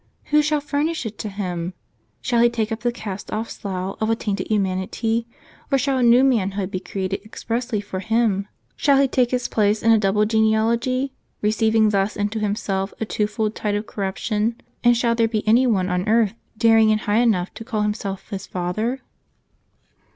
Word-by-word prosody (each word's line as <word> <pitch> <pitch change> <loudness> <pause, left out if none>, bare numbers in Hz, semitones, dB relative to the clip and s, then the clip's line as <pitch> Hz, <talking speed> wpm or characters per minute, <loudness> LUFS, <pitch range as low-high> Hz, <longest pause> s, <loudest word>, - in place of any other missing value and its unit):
Who 300 0 +6
shall 300 0 +1
furnish 295 0 -1
it 215 -1 -6
to 215 - -4
Him? 180 -3 -4 0.5
Shall 240 -1 +1
He 240 - +6
take 225 -2 -2
up 225 - -2
the 240 0 0
cast 205 -5 -7
off 220 +2 -3
slough 190 -1 -4
of 220 - +1
a 225 - +3
tainted 210 -3 -3
humanity, 215 +3 -1 0.4
or 275 - +4
shall 270 0 0
a - - +1
new 240 +2 +6
manhood 200 -7 +1
be 185 - -2
created 195 +1 -4
expressly 230 +1 -3
for 190 -2 -5
Himif 215 -2 +1 0.3
Shall 280 -2 +3
He 275 - +4
take 250 -2 +2
His 250 -1 -1
place 210 0 +1
in 230 - +5
a 225 - +5
double 210 +1 +2
genealogy, 230 +4 +1 0.3
receiving 220 +1 +3
thus 200 0 0
into 205 +2 -1
Himself 200 -2 -2
a 220 - -1
twofold 210 0 -1
tide 210 -2 -2
of 205 +1 -2
corruption; 210 +4 -2 0.2
and 240 0 +5
shall 235 -1 +2
there 230 -1 +2
be 220 -1 -3
any 240 +4 +5
one 190 -6 +1
on 180 +2 -1
earth 225 -2 +3 0.2
daring 225 -1 +5
and 215 0 +1
high 205 +1 +1
enough 205 -7 +1
to - - -8
call 220 -3 -2
himself 210 -2 -3
His 195 -1 -6
father?" 215 +9 -2
220 Hz, 190 wpm, -22 LUFS, 200-235 Hz, 0.5 s, Who